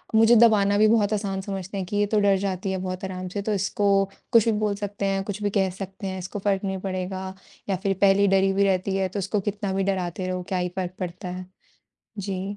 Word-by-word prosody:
मुझे 225 Hz, +2 st, +6 dB
दबाना 210 Hz, -3 st, +5 dB
भी 215 Hz, +1 st, +5 dB
बहुत 215 Hz, -2 st, +3 dB
आसान 200 Hz, -2 st, -2 dB
समझते 195 Hz, 0 st, -5 dB
हैं 190 Hz, -, -2 dB
कि 205 Hz, -, -2 dB
ये 205 Hz, -, +3 dB
तो 215 Hz, -, +5 dB
डर 200 Hz, -1 st, +4 dB
जाती 190 Hz, 0 st, -2 dB
है 190 Hz, -, -1 dB
बहुत 185 Hz, +1 st, -4 dB
आराम 185 Hz, -1 st, -5 dB
से 200 Hz, +3 st, -4 dB
तो 210 Hz, +1 st, -1 dB
इसको 195 Hz, 0 st, +2 dB, 0.3 s
कुछ 230 Hz, -3 st, +6 dB
भी 230 Hz, -, +3 dB
बोल 210 Hz, -1 st, 0 dB
सकते 200 Hz, -1 st, -4 dB
हैं, 195 Hz, 0 st, 0 dB
कुछ 205 Hz, +1 st, -5 dB
भी 205 Hz, -, +2 dB
कह 195 Hz, -2 st, +1 dB
सकते 195 Hz, +2 st, -7 dB
हैं, 190 Hz, 0 st, -4 dB
इसको 185 Hz, +3 st, -5 dB
फ़र्क 195 Hz, 0 st, 0 dB
नहीं 190 Hz, -1 st, -2 dB
पड़ेगा 185 Hz, 0 st, -4 dB, 0.4 s
या 195 Hz, -, +2 dB
फिर 195 Hz, -2 st, +2 dB
पहले 200 Hz, 0 st, +5 dB
ही 200 Hz, -, +5 dB
डरी 195 Hz, 0 st, +3 dB
हुई 195 Hz, +1 st, +2 dB
रहती 190 Hz, 0 st, +1 dB
है, 190 Hz, -1 st, 0 dB
तो 200 Hz, -, -4 dB
उसको 200 Hz, +2 st, -1 dB
कितना 200 Hz, -1 st, -3 dB
भी 195 Hz, 0 st, 0 dB
डराते 185 Hz, -1 st, -2 dB
रहो 185 Hz, 0 st, -3 dB
क्या 185 Hz, -, 0 dB
ही 180 Hz, 0 st, -1 dB
फ़र्क 185 Hz, -1 st, -2 dB
पड़ता 180 Hz, 0 st, -5 dB
है। 180 Hz, +1 st, -6 dB, 0.7 s
जी। 195 Hz, 0 st, -4 dB
195 Hz, 250 wpm, -25 LUFS, 185-205 Hz, 0.7 s, मुझे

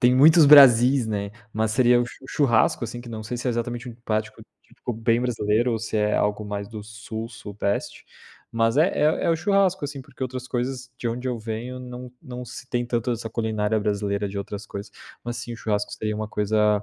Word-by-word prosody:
tem 125 Hz, 0 st, +5 dB
muitos 155 Hz, +5 st, +7 dB
"Brasis", 130 Hz, -3 st, +8 dB
né, 100 Hz, -2 st, -3 dB, 0.2 s
mas 110 Hz, 0 st, 0 dB
seria 120 Hz, 0 st, +4 dB
o 120 Hz, -, 0 dB
chu 130 Hz, -, -13 dB
o -, -, -13 dB
churrasco, 120 Hz, -5 st, +2 dB
assim, 120 Hz, +1 st, -6 dB
que 120 Hz, -, -11 dB
não 110 Hz, -2 st, -6 dB
sei 120 Hz, +3 st, -4 dB
se 125 Hz, -, -5 dB
é -, -, +2 dB
exatamente 120 Hz, +1 st, -3 dB
um 120 Hz, -, -8 dB
prato 110 Hz, -1 st, -1 dB, 0.3 s
típico 125 Hz, -, -7 dB
bem 115 Hz, +1 st, +1 dB
brasileiro 120 Hz, -1 st, +1 dB
ou 115 Hz, -, 0 dB
se 110 Hz, 0 st, -3 dB
é 105 Hz, 0 st, +2 dB
algo 105 Hz, +1 st, 0 dB
mais 100 Hz, -1 st, -5 dB
do 110 Hz, -2 st, -8 dB
Sul, 110 Hz, +1 st, -7 dB
Sudeste, 105 Hz, -3 st, -4 dB, 0.5 s
mas 115 Hz, +1 st, +2 dB
é 160 Hz, +5 st, +5 dB
é 155 Hz, -3 st, +1 dB
é -, -, +3 dB
o 165 Hz, -, +2 dB
churrasco, 195 Hz, -2 st, +2 dB
assim, 140 Hz, -1 st, -5 dB
porque 130 Hz, 0 st, -11 dB
outras 130 Hz, 0 st, -4 dB
coisas, 125 Hz, +1 st, -3 dB
de 120 Hz, -, -4 dB
onde 125 Hz, +3 st, -3 dB
eu 125 Hz, -2 st, -2 dB
venho, 115 Hz, +3 st, -5 dB
não 125 Hz, 0 st, -8 dB
não 125 Hz, -1 st, -7 dB
se 125 Hz, -, -9 dB
tem 120 Hz, -1 st, -1 dB
tanto 120 Hz, 0 st, -1 dB
essa 115 Hz, 0 st, -4 dB
culinária 110 Hz, -1 st, 0 dB
brasileira 100 Hz, -1 st, -1 dB
de 100 Hz, +1 st, -5 dB
outras 100 Hz, +1 st, -6 dB
coisas. 100 Hz, 0 st, -8 dB, 0.3 s
Mas, 120 Hz, 0 st, -4 dB
sim, 120 Hz, 0 st, -6 dB
o 115 Hz, -, -6 dB
churrasco 105 Hz, -2 st, -2 dB
seria 105 Hz, -1 st, -3 dB
uma 110 Hz, 0 st, -4 dB
coisa 105 Hz, 0 st, +2 dB
115 Hz, 220 wpm, -24 LUFS, 105-125 Hz, 0.5 s, Brasis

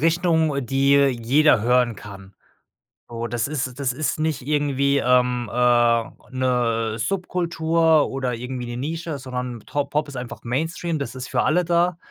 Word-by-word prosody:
Richtung, 160 Hz, -4 st, +1 dB
die 135 Hz, +3 st, +2 dB
jeder 135 Hz, +1 st, +3 dB
hören 120 Hz, 0 st, +2 dB
kann. 100 Hz, -1 st, -12 dB, 0.7 s
So, 115 Hz, 0 st, -5 dB
das 115 Hz, +1 st, -2 dB
ist 135 Hz, -3 st, -4 dB
das 130 Hz, -3 st, 0 dB
ist 150 Hz, +1 st, -2 dB
nicht 155 Hz, -2 st, -1 dB
irgendwie, 140 Hz, 0 st, +1 dB
ähm, 125 Hz, -2 st, +2 dB
äh, 120 Hz, -1 st, +3 dB, 0.3 s
'ne 120 Hz, -4 st, 0 dB
Subkultur 165 Hz, -, +1 dB
oder 130 Hz, -2 st, -2 dB
irgendwie 125 Hz, +1 st, -5 dB
'ne 120 Hz, -, -6 dB
Nische, 160 Hz, +2 st, -4 dB
sondern 125 Hz, -2 st, -5 dB
To 145 Hz, -1 st, -1 dB
Pop 150 Hz, +1 st, -2 dB
ist 135 Hz, -3 st, -8 dB
einfach 125 Hz, -1 st, -7 dB
Mainstream, 160 Hz, +6 st, -2 dB
das 140 Hz, -5 st, -5 dB
ist 130 Hz, 0 st, -7 dB
für -, -, 0 dB
alle 175 Hz, +4 st, +2 dB
da. 175 Hz, +1 st, +1 dB
135 Hz, 155 wpm, -22 LUFS, 120-155 Hz, 0.7 s, jeder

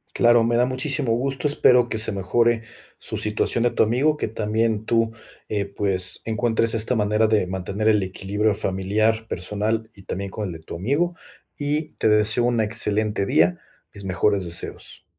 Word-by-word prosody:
Claro, 120 Hz, -1 st, +5 dB
me 115 Hz, +1 st, +1 dB
da 120 Hz, +1 st, +3 dB
muchísimo 130 Hz, 0 st, -2 dB
gusto, 135 Hz, +4 st, -1 dB
espero 125 Hz, -4 st, +4 dB
que 110 Hz, -, -1 dB
se 110 Hz, -, -1 dB
mejore, 115 Hz, +4 st, +1 dB, 0.3 s
su -, -, -6 dB
situación 105 Hz, +2 st, 0 dB
de 120 Hz, -, +2 dB
tu -, -, +3 dB
amigo, 135 Hz, +8 st, +1 dB
que -, -, -2 dB
también 110 Hz, 0 st, -1 dB
tú, 115 Hz, -1 st, +1 dB, 0.4 s
eh, 100 Hz, -2 st, -1 dB
pues, 95 Hz, -2 st, 0 dB
encuentres 115 Hz, 0 st, +1 dB
esta 115 Hz, +3 st, +1 dB
manera 105 Hz, +1 st, +2 dB
de 105 Hz, -4 st, +1 dB
mantener 95 Hz, +3 st, -3 dB
el 105 Hz, -2 st, +4 dB
equilibrio 100 Hz, +3 st, -1 dB
familiar, 110 Hz, +4 st, 0 dB
personal 105 Hz, +5 st, -2 dB
y 100 Hz, -, -12 dB
también 100 Hz, +1 st, -4 dB
con 105 Hz, -1 st, -4 dB
el 90 Hz, -, -6 dB
de 80 Hz, -, -9 dB
tu 80 Hz, -, -9 dB
amigo, 145 Hz, -, 0 dB, 0.4 s
y 150 Hz, +2 st, -2 dB
te 110 Hz, -, 0 dB
deseo 105 Hz, +3 st, +4 dB
una 120 Hz, -2 st, +1 dB
excelente 105 Hz, -2 st, 0 dB
día, 90 Hz, -1 st, +2 dB, 0.3 s
mis 100 Hz, -, -9 dB
mejores 95 Hz, +1 st, +1 dB
deseos. 85 Hz, 0 st, -5 dB
110 Hz, 175 wpm, -23 LUFS, 100-120 Hz, 0.4 s, Claro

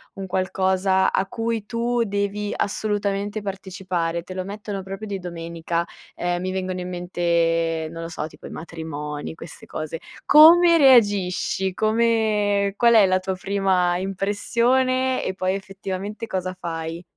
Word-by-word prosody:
un 195 Hz, -1 st, -6 dB
qualcosa 190 Hz, 0 st, +1 dB
a 190 Hz, -, +1 dB
cui 225 Hz, +1 st, -3 dB
tu 235 Hz, +1 st, 0 dB
devi 205 Hz, 0 st, -2 dB
assolutamente 205 Hz, 0 st, -2 dB
partecipare, 185 Hz, -4 st, -3 dB
te 185 Hz, +1 st, -9 dB
lo 185 Hz, -, -2 dB
mettono 205 Hz, -1 st, -6 dB
proprio 195 Hz, +3 st, -7 dB
di 200 Hz, -1 st, -3 dB
domenica. 170 Hz, -1 st, -3 dB, 0.3 s
Ehm, 175 Hz, 0 st, -1 dB
mi 185 Hz, 0 st, -2 dB
vengono 185 Hz, -1 st, -3 dB
in 180 Hz, 0 st, -5 dB
mente, 170 Hz, -2 st, 0 dB
non 165 Hz, 0 st, -7 dB
lo 165 Hz, -, -6 dB
so, 160 Hz, -2 st, -4 dB
tipo -, -, -15 dB
i -, -, -8 dB
matrimoni, 150 Hz, -3 st, -6 dB
queste 165 Hz, 0 st, -11 dB
cose. 155 Hz, +1 st, -5 dB, 0.3 s
Come 335 Hz, +3 st, +8 dB
reagisci? 205 Hz, -, +3 dB
Come 215 Hz, -2 st, +1 dB
qual 235 Hz, -1 st, +5 dB
è 220 Hz, -3 st, +7 dB
la 185 Hz, 0 st, +2 dB
tua 185 Hz, 0 st, -3 dB
prima 185 Hz, -2 st, +1 dB
impressione 235 Hz, +7 st, +1 dB
e 190 Hz, -, -2 dB
poi, 185 Hz, 0 st, -1 dB
effettivamente, 195 Hz, +2 st, -6 dB
cosa 185 Hz, -2 st, -3 dB
fai? 165 Hz, 0 st, -5 dB
190 Hz, 145 wpm, -23 LUFS, 175-210 Hz, 0.3 s, Come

